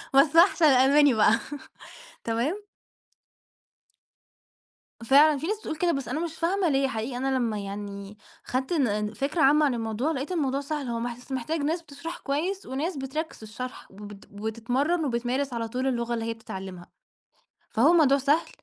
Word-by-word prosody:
بس 285 +3 +5
أحسن 340 -1 +6
الألماني 280 +1 +5
بقى، 220 0 +4 0.9
تمام. 285 - -2 2.4
فعلًا 290 +4 +6
في 315 - -4
ناس 420 +2 -1
بتقول 315 - -5
كده 345 +2 +1
بس 275 -4 -3
أنا 310 - -2
مش 335 -1 -3
فاهمة 355 +2 0
ليه 270 -1 +2
حقيقي! 245 0 -4
أنا 265 +1 0
لمّا 230 -4 -1
يعني 200 0 -7 0.3
خدت 260 +5 -2
ن 210 -8 0
فكرة 285 +8 -2
عامة 295 +3 +5
عن 275 - +1
الموضوع 230 +5 -2
لقيت 280 +2 -4
الموضوع 280 -6 0
سهل. 285 -1 -4
هو 235 -1 -2 0.2
بس 250 +2 -15
محتاج 265 +5 -2
ناس 320 +4 -1
بتشرح 320 +2 -8
كويس، 345 +8 -2
وناس 290 +6 -3
بتركز 290 +4 -4
في - - -14
الشرح، 250 +4 -8
وبت 205 0 -11
وبتتمرن، 245 +10 -1
وبتمارس 255 +2 -1
على 230 -1 -2
طول 255 +4 -2
اللغة 240 -2 -1
اللي 230 -1 -2
هي 230 - -2
بتتعلمها. 190 -5 -9 0.8
فهو 275 +10 +4
موضوع 290 -5 +5
سهل. 285 +4 +1
270 Hz, 160 wpm, -26 LUFS, 230-310 Hz, 2.4 s, أحسن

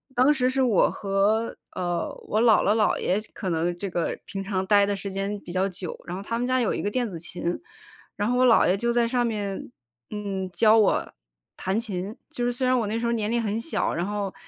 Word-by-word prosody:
当 255 +4 +5
时 255 -3 +1
是 265 +1 0
我 240 -7 +4
和 205 +3 0 0.2
呃， 175 -1 -2
我 215 - +1
姥 230 -3 +6
姥 205 - +3
姥 215 -2 +2
爷 190 - +1 0.2
可 195 - -5
能 170 +2 0
这 195 +2 -4
个 175 -1 -2
平 195 -1 -5
常 190 -1 -2
待 205 -1 +5
的 205 - 0
时 195 +1 -5
间 195 +1 -3
比 175 - -9
较 190 +1 +1
久， 180 -2 -5
然 175 +2 -5
后 - - -5
他 230 +3 -3
们 245 - -1
家 255 0 +2
有 235 - +1
一 - - -2
个 205 - -1
电 245 0 0
子 175 -5 -6
琴， 170 +1 -3 0.6
然 205 +3 0
后 250 - +1
我 255 - +5
姥 230 - +6
爷 180 - +3
就 235 +4 0
在 235 -1 +2
上 245 0 +1
面， 200 - -3 0.4
嗯， 195 -3 -4
教 220 +3 +5
我 215 -3 +2 0.4
弹 195 +4 -1
琴。 200 -3 -4 0.2
就 245 -6 -3
是 245 - +1
虽 255 +1 0
然 255 - +3
我 230 - 0
那 220 +2 -1
时 235 - -2
候 235 - +1
年 215 -2 -1
龄 235 - +1
很 215 0 -1
小， 310 - -1
然 170 +3 -1
后 205 -1 -3
210 Hz, 260 characters per minute, -25 LUFS, 190-235 Hz, 0.6 s, 姥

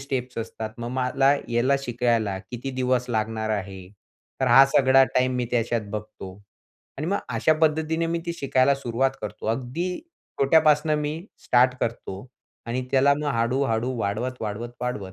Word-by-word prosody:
Steps 130 -3 -4
असतात. 110 -1 -5
मग 120 0 -4
मला 130 +2 +2
याला 120 +4 +2
शिकायला 115 -5 0
किती 125 +2 -5
दिवस 125 -1 0
लागणार 110 0 -1
आहे. 95 -3 -4 0.5
तर - - +2
हा 135 - +8
सगळा 135 0 +6
टाईम 130 0 +2
मी 125 -1 -1
त्याच्यात 115 -3 -1
बघतो. 100 -3 -7 0.6
आणि 155 - -3
मग 200 +2 0
अशा 120 +6 +2
पद्धतीने 160 +1 +1
मी 170 0 -1
ती 170 - -1
शिकायला 135 0 +3
सुरुवात 130 0 0
करतो. - - -6
अगदी 130 +11 -2 0.4
छोट्यापासनं 155 +1 +4
मी 150 +2 -3 0.2
स्टार्ट 125 +1 +4
करतो 115 -1 -4 0.4
आणि 125 +2 -2
त्याला 140 +1 +4
मग 150 +1 -4
हळू-हळू 120 +1 0
वाढवत, 110 +5 -2
वाढवत, 110 +2 -4
वाढवत, 105 -6 -4
125 Hz, 150 wpm, -24 LUFS, 115-140 Hz, 0.6 s, हा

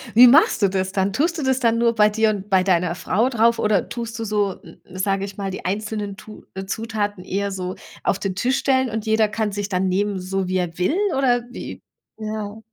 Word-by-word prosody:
wie 245 +2 +10
machst 275 -1 +5
du 200 - +4
das 190 0 -2
dann? 195 0 +1
Tust 330 - 0
du 305 - -3
das 265 -1 +1
dann 230 -2 +2
nur 235 0 +3
bei 210 -2 +4
dir 220 +1 +2
und 205 -1 -4
bei 190 -2 +4
deiner 180 -2 +1
Frau 195 +7 +1
drauf 235 -2 +2
oder 210 -3 +1
tust 235 -1 -5
du 225 - -3
so, 205 -3 -1
m 165 - -15
m 185 - -12
sage 195 0 0
ich 195 -1 -9
mal, 195 -1 -4
die 190 - -7
einzelnen 205 +1 -3
Tu 210 +1 -12
äh, 190 0 -6
Zutaten 205 -2 -3
eher 200 +2 -2
so 185 -1 -4 0.3
auf - - +1
den 195 -2 -3
Tisch 250 +7 +1
stellen 260 -2 +2
und 220 0 -4
jeder 220 0 +3
kann 210 0 -2
sich 205 0 -3
dann 185 -1 0
nehmen, 200 +1 0
so 190 0 -2
wie 185 +1 0
er 175 -2 -3
will 180 - +1 0.2
oder 245 -3 +2
wie? - - -8 0.4
Ja. 215 -1 -5
205 Hz, 235 wpm, -22 LUFS, 190-225 Hz, 0.4 s, wie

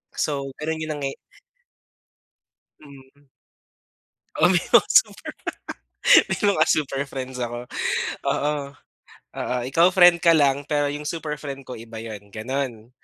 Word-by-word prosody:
So, 140 -2 -2
gano'n 160 +1 -3
yung 155 - -4
nangyaya 135 -1 -4 1.6
Mhm. 140 0 -17 1.1
Oo, - - +4
may - - +3
mga - - +6
super - - +3
pa - - -35 0.9
may - - -1
mga 200 -6 +3
super 140 -2 0
friends 130 -1 -7
ako. 120 -1 -4 0.7
Oo, 150 +1 +1 0.9
oo 125 - -2
ikaw 165 +7 +4
friend 175 -2 +6
ka 170 - +6
lang 140 -1 +2
pero 145 -1 +1
yung 145 +1 -5
super 160 -3 -4
friend 140 -2 -7
ko 125 - -7
iba 115 0 -10
'yon, 105 -3 -9
gano'n. 120 0 -4
140 Hz, 135 wpm, -23 LUFS, 125-150 Hz, 1.6 s, mga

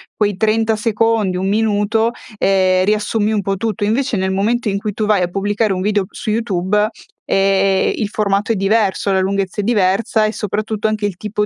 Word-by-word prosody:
quei 205 -3 0
30 220 +1 +1
secondi, 215 -3 0
1 190 +1 -2
minuto, 220 +1 +1 0.3
ehm, 185 -2 +2
riassumi 210 +1 0
un 215 -2 0
po' 195 0 -2
tutto; 215 +1 -2
invece, 235 +2 0
nel 190 0 -1
momento 215 +4 0
in 200 - -1
cui 205 +1 -4
tu 215 - -2
vai 205 -4 +3
a - - +1
pubblicare 205 +2 0
un 185 - -3
video 205 0 0
su - - -6
YouTube, 210 -2 0 0.4
ehm, 195 0 +2
il 215 - -2
formato 205 0 0
è - - +1
diverso, 200 0 +1
la 190 - +2
lunghezza 195 +1 -1
è - - -5
diversa, 215 +1 +1
e 215 - 0
soprattutto 215 +1 -2
anche 215 -1 -1
il 190 -4 -6
tipo 210 +1 -2
205 Hz, 195 wpm, -17 LUFS, 195-220 Hz, 0.4 s, vai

